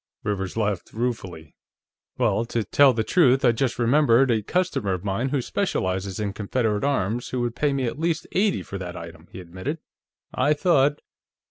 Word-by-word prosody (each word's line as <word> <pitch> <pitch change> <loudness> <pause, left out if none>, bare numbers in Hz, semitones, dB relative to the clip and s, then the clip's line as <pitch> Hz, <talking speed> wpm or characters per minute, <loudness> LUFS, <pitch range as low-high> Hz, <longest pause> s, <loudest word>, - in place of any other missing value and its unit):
Rivers 100 -1 -3
laughed 105 -4 -2
ruefully. 95 -9 -4 0.6
"Well, 115 -3 +1
to 115 -1 -2
tell 140 +5 +5
the 115 -2 -1
truth, 135 -4 +3
I 120 - +6
just 120 +1 -1
remembered 125 0 +4
a 110 -2 +1
customer 170 - -1
of 90 0 -4
mine 105 +6 -1
who 135 -2 -1
specializes 95 - -2
in 100 -2 -2
Confederate 105 +1 -1
arms, 120 -4 -1
who 130 - -3
would 120 -1 -2
pay 145 +3 +1
me 135 -2 -1
at 120 +5 -4
least 165 -1 -1
eighty 200 +1 +1
for 100 - -7
that 90 -1 -6
item," 85 0 -10
he - - -9
admitted. 95 - -5 0.6
"I 150 - +2
thought..." 145 -3 +2
115 Hz, 175 wpm, -24 LUFS, 100-140 Hz, 0.6 s, I